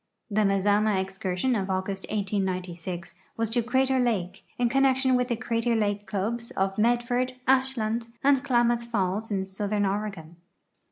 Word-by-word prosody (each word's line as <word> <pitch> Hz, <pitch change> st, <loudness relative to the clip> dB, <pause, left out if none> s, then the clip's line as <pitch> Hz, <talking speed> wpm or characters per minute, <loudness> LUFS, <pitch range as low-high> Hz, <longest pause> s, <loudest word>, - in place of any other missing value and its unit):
The 215 Hz, +1 st, +2 dB
Mazama 205 Hz, +1 st, +3 dB
excursion 190 Hz, +4 st, -1 dB
of 195 Hz, -3 st, -2 dB
August, 190 Hz, +1 st, -2 dB
1896, 185 Hz, -4 st, -3 dB, 0.2 s
was 225 Hz, -1 st, -1 dB
to 240 Hz, +1 st, +2 dB
Crater 260 Hz, +2 st, +2 dB
lake, 195 Hz, -7 st, -1 dB
in 245 Hz, -, +2 dB
connec 270 Hz, +1 st, +3 dB
tion 260 Hz, -1 st, +3 dB
with 250 Hz, 0 st, +1 dB
the 240 Hz, -, 0 dB
Crater 230 Hz, 0 st, 0 dB
Lake 205 Hz, -2 st, -1 dB
clubs 230 Hz, +4 st, -2 dB
of 195 Hz, 0 st, -1 dB
Medford, 245 Hz, +2 st, +1 dB
Ashland, 245 Hz, -4 st, +1 dB, 0.2 s
and 275 Hz, -1 st, +4 dB
Klamath 240 Hz, -3 st, +2 dB
Falls 210 Hz, -1 st, -1 dB
in 195 Hz, -2 st, -1 dB
southern 205 Hz, +2 st, -1 dB
Oregon. 195 Hz, -5 st, -3 dB
215 Hz, 150 wpm, -27 LUFS, 195-240 Hz, 0.2 s, and